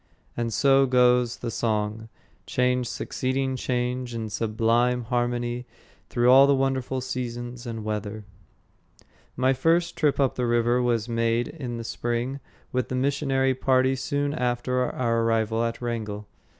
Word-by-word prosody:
And 120 -1 -2
so 135 +4 +4
goes 125 -1 +3
the 120 - -4
song, 110 0 -2 0.4
change 125 -1 +1
succeeding 130 0 -2
change 125 -1 -2
in 110 -2 -4
sublime 115 +3 +1
harmony 120 0 -2 0.4
through 120 0 +3
all 135 +2 +8
the 140 - +4
wonderful 130 -1 -1
seasons 120 -1 -5
and 115 -2 -5
weather. 105 0 -4 1.1
My 130 +1 +2
first 165 +6 +1
trip 150 -5 +1
up 135 -2 +2
the 125 -1 -1
river 120 +1 +2
was 120 -2 0
made 115 0 0
in 125 -7 -6
the 115 - -5
spring 120 +4 -3 0.3
with 130 -1 -1
the 130 - -2
missionary 135 0 +1
party 130 0 +2
soon 145 +2 -1
after 125 -1 0
our 115 -2 0
arrival 115 0 +1
at 115 0 -2
Wrangell. 105 -3 -4
125 Hz, 140 wpm, -25 LUFS, 115-130 Hz, 1.1 s, all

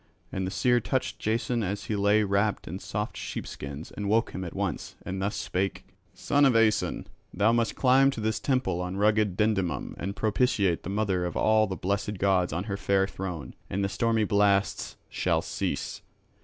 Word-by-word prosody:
And 95 -1 -2
the - - -3
seer 120 +3 +3
touched 130 +3 -2
Jason 115 +2 0
as 100 0 -2
he 110 - -2
lay 105 +1 +3
wrapped 100 +1 0
in 90 +4 -5
soft 105 +2 -4
sheepskins 70 +4 -6
and 100 -1 -4
woke 110 +2 +2
him 95 - -5
at 85 - -7
once, - - -3
and 95 +1 -3
thus 100 +2 -1
spake: 95 +2 -2 0.3
"Son 145 0 +1
of 135 -4 +5
Aeson, 110 -2 +2 0.3
thou 105 +2 +3
must 115 -1 +1
climb 135 +1 +5
to 135 - -4
this 110 0 -1
temple 130 -10 0
on 90 +1 -4
rugged 105 -2 +2
Dindymum 95 -9 0
and 100 +3 -3
propitiate 105 -5 +1
the - - -6
mother 100 -3 0
of 90 - -3
all 110 0 +4
the 95 - -3
blessed 100 +3 -2
gods 95 -2 +2
on 85 +4 -2
her 100 -1 -3
fair 100 -1 +2
throne, 90 -8 -6 0.2
and 100 +2 -1
the 100 - 0
stormy 115 +1 +1
blasts 100 -1 +1
shall - - 0
cease. - - -3
100 Hz, 185 wpm, -28 LUFS, 95-110 Hz, 0.3 s, of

